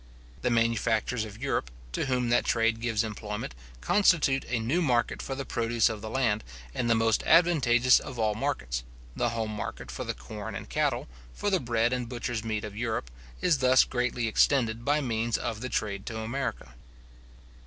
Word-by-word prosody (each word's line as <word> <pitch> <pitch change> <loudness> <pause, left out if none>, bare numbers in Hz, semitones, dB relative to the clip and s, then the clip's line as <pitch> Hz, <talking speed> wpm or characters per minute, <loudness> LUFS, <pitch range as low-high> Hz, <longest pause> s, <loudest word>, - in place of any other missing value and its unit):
The - - +1
manufacturers 115 0 +1
of 105 0 -10
Europe, 135 - -1 0.2
to 60 - -2
whom 125 -2 0
that 120 - +3
trade 115 0 +1
gives 115 -2 +1
employment, 105 - -5 0.3
constitute 165 - +3
a 120 -1 0
new 130 +11 +1
market 125 -7 +1
for 135 - -4
the 140 0 -4
produce 115 -2 +1
of 110 -2 -5
the 110 - -5
land, 110 -4 +1 0.3
and 120 - -1
the 115 - +5
most 115 -1 +2
advantageous 130 -8 +5
of 125 - -8
all 110 -2 +1
markets; - - -2 0.3
the 120 - +1
home 115 -2 -2
market 105 - -5
for - - -5
the - - -3
corn 60 +1 -7
and - - -6
cattle, - - 0 0.3
for 205 - -1
the 190 - +3
bread 120 -2 +1
and 125 -2 -2
butcher's 120 -2 -3
meat 110 -2 -2
of 105 -1 -6
Europe, 110 - -2 0.3
is 170 -6 +3
thus 130 0 +6
greatly 125 -2 -1
extended 115 -1 +2
by 145 +3 +2
means 115 -3 0
of 110 -2 -4
the 125 - -3
trade 100 -4 -2
to 115 - -4
America. 110 - -4
115 Hz, 185 wpm, -28 LUFS, 110-125 Hz, 0.3 s, thus